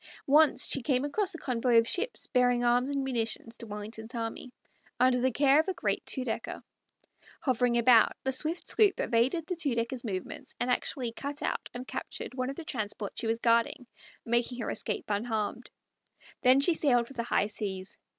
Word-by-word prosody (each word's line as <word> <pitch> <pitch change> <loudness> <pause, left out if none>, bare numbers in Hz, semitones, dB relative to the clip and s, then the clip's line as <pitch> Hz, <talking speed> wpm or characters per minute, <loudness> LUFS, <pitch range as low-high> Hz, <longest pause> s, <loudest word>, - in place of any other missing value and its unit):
Once 300 +2 +5
she 275 - -2
came 260 +1 +1
across 375 +5 -1
a - - -4
convoy 245 -4 +1
of 230 0 +4
ships 465 - -1
bearing 245 -1 +2
arms 245 +2 +2
and 280 -1 -1
munitions 230 -3 -2
to 230 - -8
Wellington's 220 +3 -7
army, 230 +2 -5 0.5
under 250 0 +4
the 260 - +3
care 280 +3 +4
of 320 - +1
a 380 - -2
great - - -1
two 260 - 0
decker. 225 - -4 0.8
Hovering 245 -2 +1
about, 235 -1 +5
the 265 - 0
swift 310 +6 0
sloop 415 -3 +3
evaded 255 +8 +1
the 360 - -3
two 290 -7 0
decker's 235 +2 -2
movements, 190 -6 -5
and 250 - 0
actually 245 -1 -1
cut 280 +5 -6
out - - -2
and 250 +1 -6
captured - - -6
one 255 0 -2
of 275 - -5
the 330 - -8
transports 210 -6 -4
she 230 - -2
was 225 0 +1
guarding, 235 +2 +1 0.4
making 240 +1 0
her 230 - -2
escape - - -2
unharmed. 215 0 -2 0.7
Then 255 +2 +5
she 340 +5 +6
sailed 250 -7 +2
for 275 - -13
the 240 - -2
high 230 - +1
seas. 200 -2 -5
245 Hz, 190 wpm, -29 LUFS, 230-275 Hz, 0.8 s, she